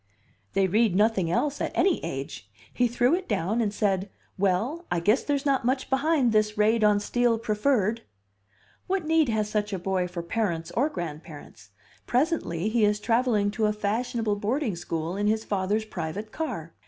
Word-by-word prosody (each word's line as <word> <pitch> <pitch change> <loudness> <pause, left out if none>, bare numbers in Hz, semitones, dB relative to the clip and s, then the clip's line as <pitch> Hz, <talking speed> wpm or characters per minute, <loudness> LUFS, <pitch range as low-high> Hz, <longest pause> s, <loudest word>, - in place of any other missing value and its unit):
"They 195 - +3
read 210 +1 +2
nothing 205 -4 +2
else 285 - 0
at - - -1
any 365 -1 +2
age. 135 -7 -6 0.2
He 245 - +2
threw 245 +4 +2
it 365 +1 -1
down 205 +3 0
and 210 -3 0
said, 200 -2 0 0.3
'Well, 200 - 0
I 175 - 0
guess 210 +9 +3
there's 285 -1 -1
not 275 -3 +2
much 260 +3 -1
behind 270 -2 +2
this 215 -1 +1
raid 215 +1 +3
on 210 -1 +4
Steel 240 +2 +1
Preferred.' 225 0 0 0.9
What 375 -3 -1
need 320 -3 +3
has 215 -2 0
such 210 0 -1
a - - 0
boy 185 0 -1
for 175 -1 -6
parents 170 -4 -2
or 275 +6 +1
grandparents? 160 - -8 0.4
Presently 245 - 0
he 220 0 +1
is 210 0 +3
travelling 225 -2 +1
to 215 0 0
a 210 - +1
fashionable 215 +1 -1
boarding 225 - -1
school 165 0 -4
in 205 +1 0
his 220 +1 +1
father's 205 +2 -1
private 195 +3 -5
car. 220 - -5
215 Hz, 175 wpm, -26 LUFS, 190-245 Hz, 0.9 s, on